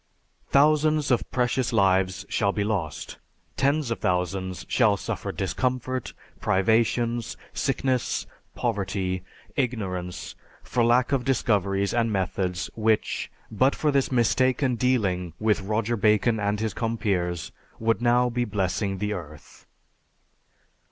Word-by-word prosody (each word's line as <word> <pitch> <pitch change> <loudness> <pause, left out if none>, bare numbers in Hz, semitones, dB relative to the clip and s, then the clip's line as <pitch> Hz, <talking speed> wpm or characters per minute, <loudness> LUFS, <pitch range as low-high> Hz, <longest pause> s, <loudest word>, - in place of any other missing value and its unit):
Thousands 150 +1 +3
of 125 - +1
precious 125 0 0
lives 95 -3 +2
shall 100 -2 +1
be 100 - -1
lost, 100 -7 -3 0.4
tens 140 -2 +1
of 115 - -2
thousands 90 0 -1
shall 110 -5 +3
suffer - - -4
discomfort, 130 -1 -2 0.3
privations, 115 +4 +1 0.2
sickness, 130 -2 0 0.3
poverty, 95 -2 -1 0.3
ignorance, 95 -9 -3 0.3
for 120 - 0
lack 120 +2 +3
of 135 -3 +1
discoveries 100 -6 +1
and 115 -1 +1
methods 95 -2 -1
which, 110 -1 0 0.2
but 130 +6 +3
for 150 - +1
this 140 -1 +1
mistaken 130 +2 +2
dealing 100 -9 0
with 105 -2 +2
Roger 110 +4 0
Bacon 110 +1 +3
and 105 0 0
his 110 -2 -1
compeers, 100 -7 -1 0.3
would 115 -1 0
now 120 +1 +4
be 120 0 -1
blessing 95 -2 -1
the 105 +2 -1
earth." 75 -5 -10
110 Hz, 120 wpm, -25 LUFS, 95-125 Hz, 0.4 s, now